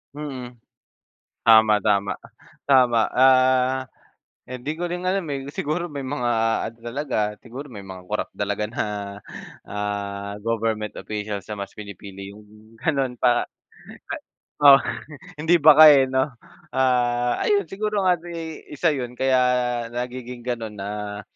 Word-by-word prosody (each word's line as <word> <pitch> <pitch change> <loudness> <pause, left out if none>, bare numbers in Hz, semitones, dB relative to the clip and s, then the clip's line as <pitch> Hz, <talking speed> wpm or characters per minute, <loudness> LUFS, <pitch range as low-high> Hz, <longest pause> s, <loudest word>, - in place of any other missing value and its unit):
Mm, 130 -5 -7 0.9
tama-tama 105 -3 +5 0.6
tama 125 -3 +5 0.2
ah, 130 0 +4 0.6
hindi 130 +3 -5
ko - - -5
rin 180 +1 -4
alam 195 +1 +1
eh, 135 -1 -4
siguro 165 +4 -2
may 145 -4 -6
mga 130 -2 -2 0.4
ano 115 - -8
talaga, 135 +5 -4 0.2
siguro 130 +4 -9
may 100 -4 -10
mga 95 -1 -9
corrupt 105 - -3
talaga 100 +1 -2
na 115 - -3 0.9
ah, 100 0 -4
government 110 -2 -2
officials 105 -2 -5
na 105 -1 -6
mas 100 - -8
pinipili 100 -1 -9
yung 105 +1 -18
ganon 135 -5 0
para 120 0 +2 1.2
Oh, 140 -1 +9 0.6
hindi 165 +2 +3
baka 155 +1 +9
eh 135 -1 +4
no? 130 +1 0 0.4
Ah, 125 -2 +2
ayun 200 -5 +1
siguro 210 +1 -1
ano 180 -2 +1
eh, 165 -2 -7
isa 165 +4 +2
yun 125 -5 -3
kaya 130 0 +2 0.6
nagiging 125 0 -5
ganon 115 -3 -4
na 105 +1 -5
125 Hz, 125 wpm, -23 LUFS, 105-140 Hz, 1.2 s, Oh